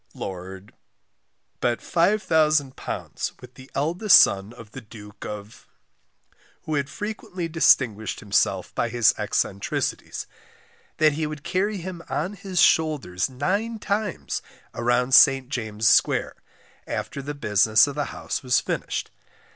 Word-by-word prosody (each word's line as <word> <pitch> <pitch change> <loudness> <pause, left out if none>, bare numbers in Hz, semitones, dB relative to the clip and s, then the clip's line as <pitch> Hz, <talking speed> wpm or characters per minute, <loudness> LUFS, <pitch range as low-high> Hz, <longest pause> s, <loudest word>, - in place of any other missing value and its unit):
Lord 95 +1 -8 0.9
bet 120 -1 +1
£5000 160 -7 0
with - - -14
the 130 +1 -14
eldest 170 +8 +5
son 100 +2 +2
of 115 -3 -13
the 135 - -9
Duke 105 -2 -12
of 105 +2 -9 1.0
who 155 - -4
had 140 -1 -1
frequently 205 -4 -5
distinguished 125 -9 +2
himself 100 -3 0
by 120 - -1
his 120 -1 +3
eccentricities, 100 -1 -2 0.7
that 155 -1 +4
he 155 +1 -2
would 150 -1 -7
carry 200 +3 -1
him 180 -1 -7
on 185 +6 -2
his 190 -2 -4
shoulders 145 - +2
nine 200 - -2
times 210 -2 -3 0.3
round 120 +2 0
St. 135 -2 +6
James's 110 -4 0
square - - +2 0.5
after 140 - -4
the 145 +2 -6
business 110 -4 +4
of 145 - -5
the 145 0 -2
house - - -5
was 125 -2 +2
finished. - - -4
135 Hz, 125 wpm, -24 LUFS, 110-165 Hz, 1.0 s, St